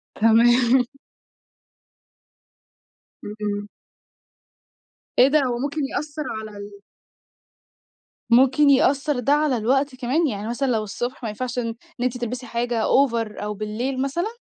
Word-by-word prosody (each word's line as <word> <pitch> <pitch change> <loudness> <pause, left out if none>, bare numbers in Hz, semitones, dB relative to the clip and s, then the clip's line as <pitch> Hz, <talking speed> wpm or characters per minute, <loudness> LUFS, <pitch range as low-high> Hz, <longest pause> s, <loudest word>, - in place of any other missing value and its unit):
تمام. 240 +3 +4 2.4
اهم. 205 -1 -4 1.5
إيه 255 - +8
ده 300 +2 +3
هو 245 -2 -1
ممكن 285 +3 -2
يأثّر 300 +2 -4 0.2
على 215 -1 -9
ال 200 0 -10 1.5
ممكن 265 +4 +5
يأثّر 275 +1 +3
ده 275 +4 +2
على 295 -3 +2
الوقت 265 +5 +1
كمان؟ 265 +6 0
يعني 210 -4 -4
مثلًا 270 +3 -1
لو 225 -3 0
الصبح 245 +5 -5
ما 225 - -2
ينفعش 245 +3 -4
إن 230 - -2 0.3
إن - - -1
أنتِ 250 0 -1
تلْبسي 245 +1 -5
حاجة 235 -1 -2
over 230 -5 +1
أو 210 0 -3
بالليل 220 +6 -3
مثلًا؟ 345 - -2
245 Hz, 125 wpm, -23 LUFS, 225-275 Hz, 2.4 s, إيه